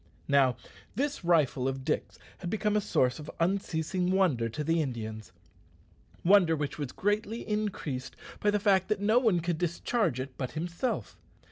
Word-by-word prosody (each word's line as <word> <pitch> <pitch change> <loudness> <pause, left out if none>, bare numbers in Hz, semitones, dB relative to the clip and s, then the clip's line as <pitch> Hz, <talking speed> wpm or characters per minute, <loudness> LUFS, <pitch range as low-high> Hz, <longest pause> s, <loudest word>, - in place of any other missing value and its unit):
Now, 135 -4 +4 0.4
this 285 -4 -1
rifle 150 -7 +2
of 135 0 -3
Dick's - - -2 0.2
had 175 - -4
become 210 +1 0
a 210 - +3
source 130 -7 +1
of 150 - -8
unceasing 180 0 0
wonder 170 -12 +2
to 150 +7 -4
the 165 +2 +2
Indians 110 -6 -5 0.9
wonder 180 -3 +6
which 145 -1 -4
was 140 -4 -3
greatly 210 +3 -1
increased 185 -12 -3 0.2
by 205 - +2
the 205 0 +2
fact 195 -2 +3
that 215 -2 0
no 215 +4 +4
one 215 -9 +2
could 170 -1 -1
discharge 175 - 0
it 130 0 -5
but 130 -2 -3
himself. 170 +9 -3
170 Hz, 160 wpm, -29 LUFS, 135-205 Hz, 0.9 s, wonder